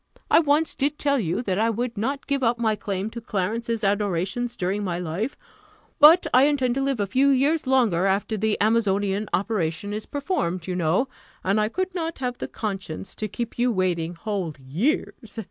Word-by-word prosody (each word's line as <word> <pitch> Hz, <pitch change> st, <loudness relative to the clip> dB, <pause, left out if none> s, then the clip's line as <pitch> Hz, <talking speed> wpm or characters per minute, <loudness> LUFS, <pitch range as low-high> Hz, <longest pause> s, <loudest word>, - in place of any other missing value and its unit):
I -, -, +7 dB
once 305 Hz, 0 st, +2 dB
did 290 Hz, +2 st, 0 dB
tell 280 Hz, -1 st, +1 dB
you, 180 Hz, +3 st, -1 dB
that 190 Hz, -3 st, -1 dB
I 225 Hz, +1 st, +3 dB
would 235 Hz, +2 st, -2 dB
not 265 Hz, +7 st, -2 dB
give 280 Hz, -1 st, -1 dB
up 240 Hz, -1 st, +2 dB
my 220 Hz, -2 st, +1 dB
claim 200 Hz, +1 st, -3 dB
to 235 Hz, -, -7 dB
Clarence's 225 Hz, +2 st, -2 dB
adorations 205 Hz, +4 st, 0 dB
during 195 Hz, +2 st, -1 dB
my 175 Hz, -3 st, -2 dB
life; 180 Hz, -, -3 dB, 0.6 s
but 315 Hz, +5 st, +8 dB
I 255 Hz, +2 st, +7 dB
intend 270 Hz, -4 st, +2 dB
to 270 Hz, -, -1 dB
live 270 Hz, -3 st, 0 dB
a 205 Hz, -, +1 dB
few 265 Hz, +7 st, +3 dB
years 280 Hz, +3 st, +2 dB
longer 225 Hz, -9 st, +3 dB
after 200 Hz, +3 st, 0 dB
the 215 Hz, 0 st, 0 dB
amazonian 205 Hz, -2 st, +1 dB
operation 200 Hz, -2 st, -1 dB
is 215 Hz, +1 st, -5 dB
performed, 230 Hz, -, -2 dB
you 185 Hz, -, -3 dB
know; 180 Hz, +9 st, +1 dB, 0.4 s
and 200 Hz, +3 st, +2 dB
I 215 Hz, -, +1 dB
could 370 Hz, +7 st, -2 dB
not 330 Hz, -2 st, -3 dB
have 250 Hz, -2 st, -3 dB
the -, -, -3 dB
conscience 195 Hz, -5 st, -5 dB
to 215 Hz, -, -4 dB
keep 235 Hz, +3 st, -5 dB
you 245 Hz, +1 st, +3 dB
waiting 175 Hz, -4 st, -1 dB
whole 185 Hz, -4 st, -3 dB
years. 215 Hz, -, -2 dB
220 Hz, 190 wpm, -24 LUFS, 190-260 Hz, 0.6 s, but